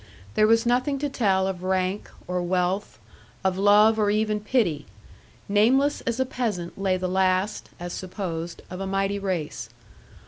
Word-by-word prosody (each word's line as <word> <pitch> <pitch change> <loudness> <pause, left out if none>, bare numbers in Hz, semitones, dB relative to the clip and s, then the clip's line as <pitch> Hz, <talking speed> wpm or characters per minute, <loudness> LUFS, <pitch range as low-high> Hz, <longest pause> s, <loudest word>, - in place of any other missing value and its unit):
There 215 - +4
was 225 +1 +4
nothing 255 +4 +1
to 290 +1 -2
tell 195 -8 +1
of 190 -2 -3
rank, 185 +1 -1 0.2
or 180 0 -2
wealth, 180 +2 -1 0.5
of 190 -1 +1
love, 210 +3 +5
or 210 -1 +3
even 215 0 +1
pity; 205 - 0 0.6
nameless 255 +8 +3
as 235 +1 -1
a 260 - +2
peasant 220 -9 -3
lay 190 -1 0
the 185 0 -2
last 185 +2 0
(as 175 0 -5
supposed) 175 -3 -5
of 180 - -6
a 195 - -3
mighty 195 +1 0
race. 170 - -3
195 Hz, 160 wpm, -25 LUFS, 185-220 Hz, 0.6 s, love